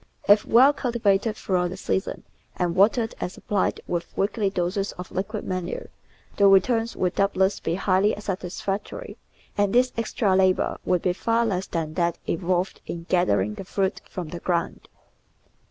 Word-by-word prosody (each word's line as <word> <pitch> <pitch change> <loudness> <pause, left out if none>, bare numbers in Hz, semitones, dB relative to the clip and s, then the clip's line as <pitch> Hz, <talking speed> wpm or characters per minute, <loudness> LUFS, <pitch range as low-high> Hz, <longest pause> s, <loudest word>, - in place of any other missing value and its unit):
If 205 +1 +6
well 260 +5 +6
cultivated 225 -5 0
throughout 180 -2 0
the 185 - -7
season, 190 0 -2 0.3
and 175 -2 -1
watered 225 +4 +3
and 180 - -2
supplied 200 +1 -1
with 175 -1 -4
weekly 200 +1 +1
doses 190 +2 -2
of 180 0 -9
liquid 205 +3 -3
manure, 185 -1 -4 0.5
the 200 - +6
returns 225 +4 +3
would 180 -1 0
doubtless 195 0 +1
be 165 - -2
highly 195 +2 +2
sat 195 -3 -3
isfactory, 195 - -5 0.4
and 205 -1 +1
this 255 +1 +4
extra 215 -3 +1
labour 190 -1 +2
would 180 -2 +1
be 180 - +2
far 230 +5 +1
less 190 -4 -1
than 160 -2 -3
that 170 0 0
involved 180 +2 -1
in 170 -1 -5
gathering 105 - +2
the - - -7
fruit 190 -1 -1
from 175 -4 -5
the 175 - -6
ground. 170 -1 -2
190 Hz, 160 wpm, -25 LUFS, 180-210 Hz, 0.5 s, If